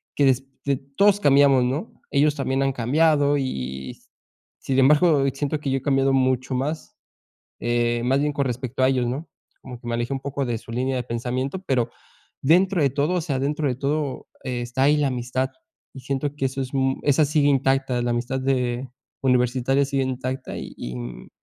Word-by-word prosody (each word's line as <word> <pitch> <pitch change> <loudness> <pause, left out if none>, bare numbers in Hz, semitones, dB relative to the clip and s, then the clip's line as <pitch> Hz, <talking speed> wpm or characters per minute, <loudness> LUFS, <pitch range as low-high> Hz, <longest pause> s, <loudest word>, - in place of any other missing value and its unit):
que 145 - +3
des 135 0 +2 0.2
de 140 -1 +2
todos 190 +10 +2
cambiamos, 140 -5 +5
¿no? 135 - -2 0.2
Ellos 145 +1 +3
también 135 -1 -1
han 135 0 +1
cambiado, 145 +3 +3
y 65 - -4
y, - - -13 0.7
sin 130 - 0
embargo, 150 +2 +5
siento 145 +2 -2
que 140 -2 -2
yo 135 - +2
he - - -18
cambiado 135 -1 +2
mucho 130 0 +1
más, 145 +5 -3 0.7
eh, 120 0 0
más 130 +2 +2
bien 150 0 0
con 140 -1 -1
respecto 125 +1 -3
a 130 - +5
ellos, 130 -2 +1
¿no? 135 +7 -4 0.3
Como 125 -2 -9
que 120 - -12
me 120 - -1
alejé 120 +3 -2
un 135 - -1
poco 140 0 -3
de 120 -2 -2
su 115 - -11
línea 130 +2 -1
de 125 - -2
pensamiento, 125 +8 -3
pero 120 -3 +1 0.5
dentro 180 +4 +4
de 140 - +3
todo, 145 +5 0
o 180 - +1
sea, 140 -4 -2
dentro 145 +2 0
de 125 - -1
todo, 140 0 -2 0.2
está 120 0 -2
ahí 145 +2 +5
la 150 -1 +1
amistad. 125 +1 -2 0.4
Y 135 - -8
siento 135 +2 -2
que 135 - 0
eso 135 +1 -4
es, 130 +1 -7
mm, 135 0 +1
esa 145 +2 +4
sigue 150 0 +2
intacta, 135 -2 +1
la 120 - -1
amistad 120 +3 -2
de 130 -1 -1 0.3
universitaria 130 +1 +2
sigue 135 -1 -1
intacta 130 0 -4
y, 60 +1 -7
mm, - - -8
135 Hz, 195 wpm, -23 LUFS, 125-140 Hz, 0.7 s, cambiamos